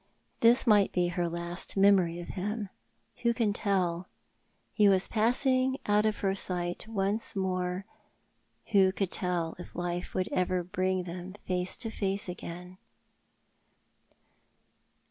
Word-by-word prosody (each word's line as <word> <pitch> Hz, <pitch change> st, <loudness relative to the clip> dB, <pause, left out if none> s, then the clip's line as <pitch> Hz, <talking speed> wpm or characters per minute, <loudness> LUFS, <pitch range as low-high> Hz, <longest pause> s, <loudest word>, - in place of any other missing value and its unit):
This 235 Hz, +2 st, +5 dB
might 210 Hz, -4 st, +5 dB
be 175 Hz, -1 st, +1 dB
her 175 Hz, -1 st, -1 dB
last 170 Hz, +3 st, -4 dB
memory 190 Hz, -4 st, +4 dB
of 175 Hz, -, -8 dB
him. 205 Hz, +2 st, -3 dB, 0.5 s
AVho 235 Hz, 0 st, +2 dB
can 220 Hz, -4 st, +1 dB
tell? 185 Hz, -4 st, 0 dB, 0.7 s
He 210 Hz, -2 st, +5 dB
was 190 Hz, -1 st, +3 dB
i)assing 255 Hz, +4 st, +2 dB
out 210 Hz, +1 st, +3 dB
of 215 Hz, -, -2 dB
her 195 Hz, -1 st, +1 dB
sight 180 Hz, 0 st, -2 dB
once 210 Hz, +1 st, -1 dB
more. 185 Hz, -1 st, -1 dB, 0.9 s
Who 195 Hz, -3 st, +5 dB
could 195 Hz, -2 st, -2 dB
tell 175 Hz, -3 st, -1 dB
if 175 Hz, -, -10 dB
life 175 Hz, 0 st, -4 dB
would 185 Hz, -1 st, 0 dB
ever 180 Hz, 0 st, 0 dB
bring 185 Hz, 0 st, -1 dB
them 180 Hz, +1 st, -7 dB
face 180 Hz, 0 st, -1 dB
to 225 Hz, -2 st, -3 dB
face 195 Hz, -2 st, 0 dB
again 180 Hz, +1 st, -8 dB
190 Hz, 130 wpm, -29 LUFS, 180-205 Hz, 0.9 s, This